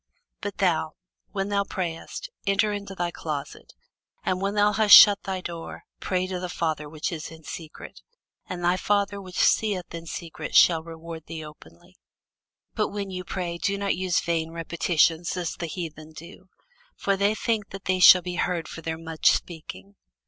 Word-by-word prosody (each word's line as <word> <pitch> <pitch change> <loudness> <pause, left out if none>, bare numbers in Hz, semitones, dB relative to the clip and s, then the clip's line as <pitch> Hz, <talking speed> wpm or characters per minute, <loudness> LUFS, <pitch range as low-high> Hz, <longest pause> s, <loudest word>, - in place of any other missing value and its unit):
But - - -5
thou, - - +1 0.4
when 195 +1 -2
thou 200 -1 +1
prayest, 185 - -5 0.2
enter 205 +2 +2
into 200 -1 -6
thy 175 -1 -2
closet, 150 -4 -6 0.5
and 185 0 0
when 200 +1 -1
thou 205 0 +4
hast 210 0 +8
shut 205 -1 +9
thy 190 -1 -3
door, 170 -2 -7 0.2
pray 185 -1 -1
to 185 -1 -4
thy 180 - -4
Father 155 -4 -2
which 155 +2 -3
is 160 -2 -5
in 160 0 -13
secret; 155 0 -9 0.5
and 175 -1 -5
thy 175 +1 +3
Father 200 0 0
which 185 -2 -10
seeth 195 -6 +2
in 170 0 -7
secret 160 -2 -6
shall 165 -2 +6
reward 165 0 -9
thee 160 -1 -6
openly. 85 - -16 0.8
But - - 0
when 200 -1 -5
ye 185 0 -4
pray, 175 -2 -4
use 200 0 +1
not 200 -1 0 0.3
vain 165 -1 0
repetitions, 165 +1 +1
as 175 -2 -2
the 170 - -5
heathen 160 -2 -7
do: 170 +4 -13 0.5
for 195 - 0
they 200 +2 +2
think 220 -2 -1
that 195 0 -9
they 185 0 +1
shall 180 0 +9
be 180 0 -4
heard 175 -2 -1
for 165 - -8
their 160 0 -4
much 160 -1 +2
speaking. 100 - -5
175 Hz, 175 wpm, -25 LUFS, 160-195 Hz, 0.8 s, shut